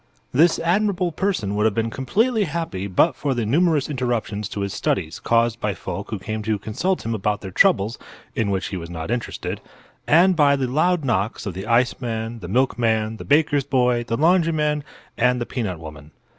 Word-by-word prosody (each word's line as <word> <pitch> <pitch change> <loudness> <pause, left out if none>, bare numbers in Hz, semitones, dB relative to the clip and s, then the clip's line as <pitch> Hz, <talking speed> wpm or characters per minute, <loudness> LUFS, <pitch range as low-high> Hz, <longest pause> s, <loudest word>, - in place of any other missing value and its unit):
This 160 +6 +4
admirable 180 +1 +1
person 170 - -1
would 105 +1 +1
have 110 -2 +2
been 115 0 0
completely 215 - +1
happy 155 - -3
but 125 - +3
for 140 0 -1
the 120 -2 -1
numerous 155 +4 +2
interruptions 120 -7 -2
to 100 - -4
his 100 -1 -2
studies 80 -4 -2
caused 115 0 +1
by 105 -2 -1
folk 95 +3 -6
who 110 - -3
came 110 +3 -4
to 110 0 -1
consult 140 - -2
him 115 - -1
about 105 0 -1
their 95 - -7
troubles 115 - +3 0.3
(in 110 -3 0
which 95 -1 -1
he 95 - -4
was 85 -1 -7
not 80 +3 -5
interested), 120 -1 -3 0.5
and 180 +4 +5
by 145 -3 +4
the 135 -2 -1
loud 155 +5 +1
knocks 115 -2 -1
of 100 - -3
the 95 +4 -6
iceman, 115 -1 0
the 90 - -8
milkman, 110 -1 +1
the - - -8
baker's 145 -1 +3
boy, 125 -3 +1
the 115 -1 -2
laundryman 155 -3 +2 0.4
and 125 +1 +3
the 120 - -2
peanut 105 -11 -3
woman. 75 -2 -10
120 Hz, 190 wpm, -22 LUFS, 105-150 Hz, 0.5 s, and